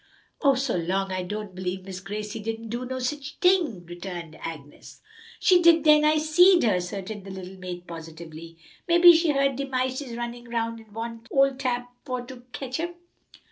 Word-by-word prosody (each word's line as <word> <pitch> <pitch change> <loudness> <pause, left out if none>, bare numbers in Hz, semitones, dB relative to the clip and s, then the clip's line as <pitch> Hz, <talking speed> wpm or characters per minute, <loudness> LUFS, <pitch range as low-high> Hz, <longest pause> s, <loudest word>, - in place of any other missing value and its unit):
"Oh, 275 -3 +5
go 235 - 0
'long! 190 +3 -1
I 185 0 -1
don' 205 +2 -5
b'lieve 185 0 -4
Miss 190 -1 -6
Gracie 210 +3 -5
didn't 225 +1 -5
do 240 +3 -3
no 260 +1 -4
sich 280 +3 -4
ting!" 340 - +2
returned 175 -2 -7
Agnes. 150 -3 -9 0.4
"She 360 -1 +5
did 335 -2 +6
den, 300 -1 +6
I 305 +1 +4
seed 345 +4 +5
her," 225 - +4
asserted 190 +3 -4
the 195 - -10
little 190 0 -8
maid 180 -1 -7
positively. 165 0 -10 0.3
"Mebbe 345 0 +9
she 325 -1 +3
heerd 275 -2 +1
de 275 0 -3
mices 255 -1 -2
runnin' 240 0 -6
'round 230 -1 -2
an 220 -1 -17
want 230 +1 -6
ole 275 0 +4
Tab 250 -2 -1 0.2
for 250 -3 -4
to 255 +1 -10
ketch 265 +2 -4
'em." 345 +1 -3
230 Hz, 180 wpm, -26 LUFS, 185-275 Hz, 0.4 s, Mebbe